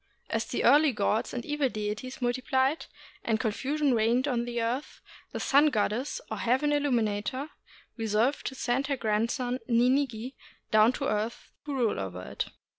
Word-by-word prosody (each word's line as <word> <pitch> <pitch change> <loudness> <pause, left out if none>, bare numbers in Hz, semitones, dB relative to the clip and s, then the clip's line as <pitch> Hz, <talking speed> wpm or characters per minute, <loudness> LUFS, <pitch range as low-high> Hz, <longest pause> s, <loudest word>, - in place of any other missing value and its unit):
As - - 0
the - - -2
earthly 295 -1 +6
gods 210 +1 0
and 240 -1 -5
evil 295 -2 0
deities 215 +4 -4
multiplied, 260 +4 +1 0.4
and 220 -1 +1
confusion 270 +5 0
reigned 235 +4 +2
on 240 -3 0
the 240 0 -3
earth, 240 +5 -2 0.3
the - - -4
Sun 290 +2 +4
Goddess, 250 - 0
or - - -2
Heaven 265 +5 +1
Illuminator, 255 -1 0 0.5
resolved 225 +5 +1
to 265 - -5
send 265 +1 0
her 280 -2 -1
grandson 235 +3 0
Ninigi 250 0 +2 0.4
down 215 +2 +6
to 275 - -3
the - - +1
earth 215 +2 -3 0.2
to 285 - -2
rule 235 - +1
over 90 -2 -5
it. - - -4
245 Hz, 160 wpm, -28 LUFS, 220-275 Hz, 0.5 s, earthly